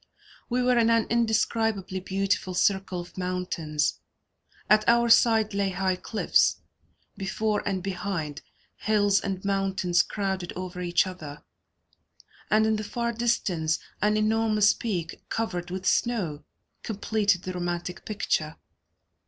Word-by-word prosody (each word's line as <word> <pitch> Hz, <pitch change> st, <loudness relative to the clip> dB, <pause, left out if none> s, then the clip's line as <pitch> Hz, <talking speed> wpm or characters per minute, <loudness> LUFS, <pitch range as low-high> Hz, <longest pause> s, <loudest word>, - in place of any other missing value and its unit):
We 250 Hz, +1 st, +1 dB
were 250 Hz, -1 st, +3 dB
in 230 Hz, 0 st, +4 dB
an 230 Hz, -1 st, +3 dB
indescribably 225 Hz, -4 st, +1 dB
beautiful 190 Hz, 0 st, -1 dB
circle 190 Hz, -1 st, +1 dB
of 175 Hz, +2 st, -11 dB
mountains; 180 Hz, -5 st, -1 dB, 0.7 s
at 215 Hz, 0 st, +5 dB
our 235 Hz, 0 st, +4 dB
side 225 Hz, -2 st, +5 dB
lay 200 Hz, -1 st, +1 dB
high 190 Hz, 0 st, 0 dB
cliffs; 215 Hz, +4 st, +2 dB, 0.6 s
before 205 Hz, +2 st, -1 dB
and 190 Hz, -3 st, -1 dB
behind, 180 Hz, -6 st, -3 dB, 0.4 s
hills 205 Hz, -2 st, +2 dB
and 195 Hz, -1 st, -4 dB
mountains 195 Hz, -3 st, +2 dB
crowded 190 Hz, -4 st, -3 dB
over 180 Hz, 0 st, -5 dB
each 175 Hz, +1 st, +2 dB
other, 155 Hz, -6 st, -8 dB, 1.1 s
and 215 Hz, +1 st, +4 dB
in 220 Hz, 0 st, +2 dB
the 215 Hz, -, -4 dB
far 235 Hz, +3 st, -2 dB
distance 180 Hz, -9 st, 0 dB, 0.2 s
an 210 Hz, +1 st, +3 dB
enormous 215 Hz, -1 st, +3 dB
peak, 180 Hz, -8 st, -4 dB
covered 180 Hz, -6 st, -2 dB
with 185 Hz, +1 st, -5 dB
snow, 185 Hz, -13 st, 0 dB, 0.4 s
completed 205 Hz, -3 st, 0 dB
the 185 Hz, -, -4 dB
romantic 175 Hz, 0 st, -4 dB
picture. 160 Hz, -7 st, -1 dB
195 Hz, 125 wpm, -26 LUFS, 180-220 Hz, 1.1 s, at